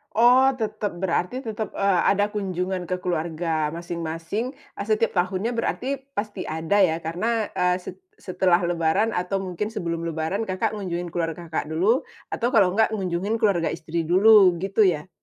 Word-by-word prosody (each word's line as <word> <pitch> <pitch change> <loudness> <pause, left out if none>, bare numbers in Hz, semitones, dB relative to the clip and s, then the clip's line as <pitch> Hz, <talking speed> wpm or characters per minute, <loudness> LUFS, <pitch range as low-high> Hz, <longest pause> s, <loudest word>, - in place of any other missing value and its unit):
Oh, 250 +3 +6
tetep. 215 -4 -3
Berarti 190 +8 -1
tetap, 220 -2 -5
eee, 195 -3 +2
ada 205 +1 +1
kunjungan 185 -3 -3
ke 180 0 -3
keluarga 160 -2 -1
masing-masing, 170 - -4
eee, 210 -7 -10
setiap 220 +1 +2
tahunnya 185 +4 0
berarti 270 +3 -1 0.2
pasti 205 -2 -4
ada 160 +6 0
ya, 165 -4 +3
karena, 215 +7 -1
eee, 180 0 +1
set - - -9 0.2
setelah 180 - +1
lebaran 175 +5 +1
atau 195 0 -2
mungkin 200 +4 -4
sebelum 170 -4 -3
lebaran 165 +7 -2
Kakak 190 +3 -1
ngunjungin 180 -4 -4
keluarga 165 0 -4
Kakak 160 - -2
dulu, 190 - +1 0.2
atau 240 - -1
kalau 195 -5 +5
nggak 220 +3 +2
ngunjungin 190 +1 -1
keluarga 180 -6 +2
istri 165 0 -3
dulu 190 0 +6
gitu 195 +1 +3
ya? 170 0 0
185 Hz, 160 wpm, -24 LUFS, 170-215 Hz, 0.2 s, Oh